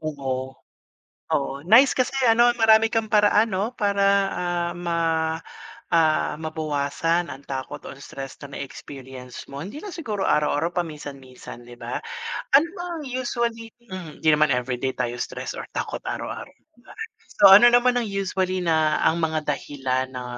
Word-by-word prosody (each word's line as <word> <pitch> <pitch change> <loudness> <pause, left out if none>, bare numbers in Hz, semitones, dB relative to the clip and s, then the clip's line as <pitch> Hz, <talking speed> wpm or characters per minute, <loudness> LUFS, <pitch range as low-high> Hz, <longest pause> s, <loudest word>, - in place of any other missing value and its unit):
Oo. 130 -4 -4 0.8
Oo, 140 0 -1
nice 245 +7 +7
kasi 255 +1 0
ano 240 0 +5
marami 225 -1 +5
kang 225 -1 -1
paraan 210 +1 +4
'no? 205 +6 -2
Para 200 -1 +2
ah, 175 -1 -2
ma 165 -2 0 0.6
ah, 160 -2 +3
mabawasan 155 +2 -1
ang 135 +1 -9
takot 135 +1 -5
o - - -7
stress 135 +1 -9
na 140 -1 -8
na-experience 130 -2 -9
mo, 140 +1 -8
hindi 200 - -7
na 395 +3 -8
siguro 215 - -3
araw-araw, 150 +3 +1
paminsan-minsan 140 -7 -7
'di 120 0 -13
ba? - - -5 0.5
Ano 295 +5 +6
bang 350 -2 -5
usually, 235 -2 -3
hmm, 185 -8 -9
hindi 160 - +3
naman 150 -2 +4
everyday 125 +1 -2
tayo 120 -1 -3
stress - - -5
or - - -6
takot - - -4
araw-araw - - -5
'diba? - - -41 0.7
So, 195 -1 +10
ano 240 +3 +8
naman 245 +1 +4
ang 240 -3 0
usually 190 -1 -1
na 160 -3 +2
ang 165 +1 +1
mga 155 -1 -1
dahilan 130 -3 -2
na 125 -1 -6
165 Hz, 150 wpm, -24 LUFS, 140-215 Hz, 0.8 s, So